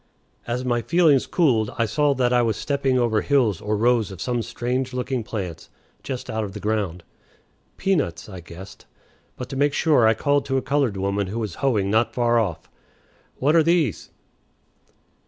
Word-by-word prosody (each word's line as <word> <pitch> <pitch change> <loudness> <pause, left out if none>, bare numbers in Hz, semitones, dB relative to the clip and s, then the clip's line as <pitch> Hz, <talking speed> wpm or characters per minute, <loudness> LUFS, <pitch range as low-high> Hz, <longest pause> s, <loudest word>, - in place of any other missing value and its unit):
As 125 +2 -2
my 120 -1 +1
feelings 160 -3 +3
cooled, 120 - +2
I 115 - +2
saw 145 +5 +1
that 125 -1 +1
I 120 - +4
was 115 -3 0
stepping 135 -2 0
over 115 -3 +1
hills 120 - +1
or 105 0 -1
rows 115 -1 +2
of 95 -3 -10
some 120 +7 -1
strange 125 +3 -3
looking 125 -1 -2
plants 90 -8 -6 0.3
just 130 -2 -6
out 110 0 -2
of 100 -2 -6
the 105 - -7
ground. 100 -5 -2 0.7
Peanuts, 155 - -1
I 95 -3 -9
guessed; 90 +3 -12 0.5
but 125 - -6
to - - -6
make 145 +1 +2
sure 145 -9 +3
I 110 - +4
called 145 +4 +1
to 135 -1 0
a - - +1
colored 140 -8 0
woman 100 +1 -1
who 105 +5 -5
was 110 -6 -3
hoeing 105 -8 +1
not 110 0 +1
far 120 -1 +2
off. 100 -8 -3 0.7
"What 145 +5 +1
are 165 - +6
these?" 165 - +1
120 Hz, 180 wpm, -23 LUFS, 105-135 Hz, 0.7 s, are